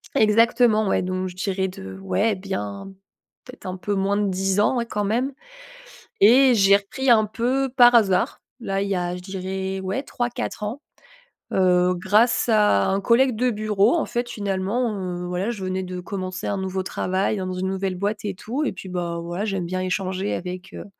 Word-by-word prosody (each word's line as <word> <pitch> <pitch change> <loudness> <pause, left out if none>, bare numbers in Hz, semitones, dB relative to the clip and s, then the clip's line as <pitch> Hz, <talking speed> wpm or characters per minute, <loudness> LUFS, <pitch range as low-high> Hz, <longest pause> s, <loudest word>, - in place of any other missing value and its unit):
Exactement, 220 0 +4
ouais, - - +2
donc 185 0 -2
je 180 - -12
dirais 190 0 -1
de 95 - -9
ouais, 205 - 0
bien 185 - -5 0.5
peut 250 - -11
être - - -19
un 185 0 -4
peu 205 +2 -2
moins 195 +1 +1
de 205 -1 +1
10 190 +1 0
ans, 225 +4 +2
hein, 235 - -2
quand 210 -2 -3
même. 240 +7 0 0.9
Et 250 +5 +7
j'ai 200 -2 +6
repris 245 +7 -2
un 220 -2 +6
peu 255 +5 0
par 245 -1 +6
hasard, 195 -6 +2 0.2
là, 195 -5 -2
il 200 - -2
y 195 - 0
a 175 0 -2
je 180 - -9
dirais, 190 0 -4
ouais, 190 +7 -3
3-4 240 -5 -4
ans, 235 +8 -5 0.7
heu, 180 -1 +3
grâce 210 +7 +2
à 210 - +3
un 195 +1 +1
collègue 240 +4 +3
de 250 +3 +1
bureau. 215 +1 +2
En 335 - +1
fait, 240 0 -3
finalement, 205 +3 -1 0.3
heu, - - -5
voilà 180 +4 -2
je 205 -5 -5
venais 185 0 -2
de 180 0 -6
commencer 185 0 -5
un 200 - -1
nouveau 190 0 -2
travail 190 +2 -1
dans 185 -1 -3
une 185 +1 -2
nouvelle 190 0 -2
boîte 205 +3 -2
et 200 - -3
tout. 235 +10 -4
Et 300 - 0
puis 190 0 -9
bah, 175 -2 -3
voilà, 175 +5 -3
j'aime 195 -4 -2
bien 185 +2 -3
échanger 185 +1 -2
avec, 180 +2 -6
heu, - - -7
195 Hz, 195 wpm, -23 LUFS, 185-220 Hz, 0.9 s, Et